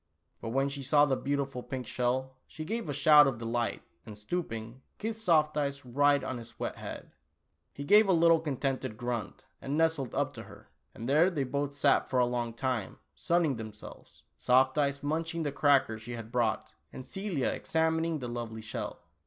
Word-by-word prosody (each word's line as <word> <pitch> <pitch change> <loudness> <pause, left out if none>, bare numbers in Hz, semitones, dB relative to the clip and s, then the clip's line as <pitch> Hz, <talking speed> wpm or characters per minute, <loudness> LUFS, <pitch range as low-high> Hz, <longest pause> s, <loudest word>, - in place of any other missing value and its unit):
But 115 - -4
when 135 +4 +1
she 140 0 -5
saw 145 +2 +4
the 135 -2 +1
beautiful 135 0 -2
pink 125 0 -5
shell, 130 +1 -1
she 155 - -8
gave 225 -2 -3
a - - 0
shout 145 +1 +7
of 130 -4 -1
delight, 115 +1 -2 0.2
and 105 -2 -10
stooping, 115 -1 -5 0.2
kissed 220 0 -4
Soft 155 -5 +3
Eyes 140 -2 -2
right 145 +3 +3
on 130 - -4
his 115 0 -12
wet - - -3
head. - - -8 0.6
He 140 - -7
gave 210 +8 +6
a - - +6
little 165 -1 +5
contented 135 -6 -3
grunt, 120 -2 -4 0.2
and 140 +2 -2
nestled 160 -6 +1
up - - 0
to - - -8
her, - - -15 0.2
and 115 - -6
there 155 +7 +5
they 155 -7 -1
both 140 +2 -2
sat 145 - +2
for 130 - 0
a 125 - +5
long 120 -1 -2
time, 125 -5 -2 0.2
sun 170 +1 +1
ning 140 -6 0
themselves, 110 -1 -11
Soft 130 - +3
Eyes 140 -1 0
munching 165 +2 -2
the 145 - -1
cracker 135 -6 +3
she 115 +2 -8
had 115 -1 -7
brought, 120 -4 0 0.2
and 130 - -9
Celia 195 -8 -2
examining 160 0 0
the 125 -4 -5
lovely 115 -2 -5
shell. 110 - -6
135 Hz, 190 wpm, -30 LUFS, 120-155 Hz, 0.6 s, shout